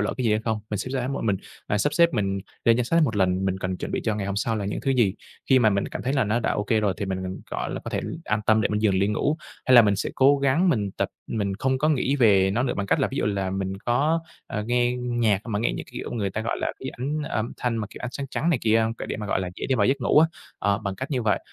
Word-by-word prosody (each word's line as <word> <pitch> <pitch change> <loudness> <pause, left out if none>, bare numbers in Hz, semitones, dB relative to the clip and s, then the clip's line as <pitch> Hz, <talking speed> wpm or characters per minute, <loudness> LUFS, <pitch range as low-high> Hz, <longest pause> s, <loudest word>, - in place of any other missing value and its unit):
lỡ 105 - -1
cái 130 - -2
gì 115 - +3
hay 110 - +1
không. 110 -2 -1
Mình 105 - -1
sẽ 130 - -4
ráng 130 0 -2
một - - -3
mình, 100 -3 +2 0.3
à, 105 - 0
sắp 145 +6 +1
xếp 170 +1 +6
mình 100 -5 -1 0.2
lên 115 0 +5
danh 125 - +1
sách 165 +7 +2
hết - - +5
một 130 - -1
lần, 95 -1 +2
mình 95 0 0
cần 95 -1 -2
chuẩn - - -5
bị - - 0
cho 110 -2 +1
ngày 100 -2 -3
hôm 100 - -3
sau 110 +2 0
là 105 - -3
những 100 - -3
thứ 135 - 0
gì. 115 -7 +3 0.4
Khi 130 - +7
mà 110 -3 +4
mình 100 0 0
cảm - - -6
thấy 130 - -1
là 135 -3 +2
nó 110 +3 0
đã - - 0
ô - - -1
kê 110 0 +2
rồi 100 -3 +1
thì 105 - -3
mình 95 -1 -3
mình, 95 0 -5
gọi - - -3
là, - - -4
có - - -5
thể - - -1 0.2
an 105 0 0
tâm 110 0 +5
để 110 - +1
mình 105 +1 -1
giường 100 -3 +3
li 95 +1 +2
ngủ. 140 +8 0 0.3
Hay 130 - +5
là, 120 - +10
mình 100 -2 +2
sẽ - - -2
cố 140 +2 +5
gắng 140 +7 +2
mình 105 - +1
tập - - -2 0.2
mình 100 -3 -2
không 130 0 +1
có 155 - +2
nghĩ 140 -2 +1
về 100 -7 +5
nó 115 +5 +1
nữa 130 - -1
bằng 100 - -2
cách - - +2
là, - - +2
ví - - -5
dụ - - +1
là, 100 -2 -1
mình 95 0 -2
có, 145 +7 +2 0.3
à, 105 - -3
nghe 120 0 +2
nhạc 120 -5 +1
mà 105 -3 -1
nghe 115 - +1
như - - -4
kiểu - - -6
người 100 -4 -1
ta 105 - -3
gọi 115 - -2
là - - -1
cái 130 - -5
ảnh 145 +5 -3
âm 115 -6 -2
thanh 120 -2 -1
mà, 105 - -2
kiểu, - - -10
ánh 120 - -2
sáng 140 -1 -4
trắng 165 - 0
này 150 - +2
kia 110 0 +4
không? 115 +1 -1
Cái - - -7
để - - -3
mà, 105 -1 -5
gọi 95 - 0
là, 90 - -3
dễ - - -5
đi 135 - +1
vào - - +3
giấc 135 +2 +1
ngủ 125 - +4
á, 160 - +7 0.3
ờ, 100 0 +1
bằng 100 -3 -4
cách 130 +7 -6
như 130 -4 0
vậy, 110 - +2
110 Hz, 330 wpm, -25 LUFS, 100-130 Hz, 0.4 s, là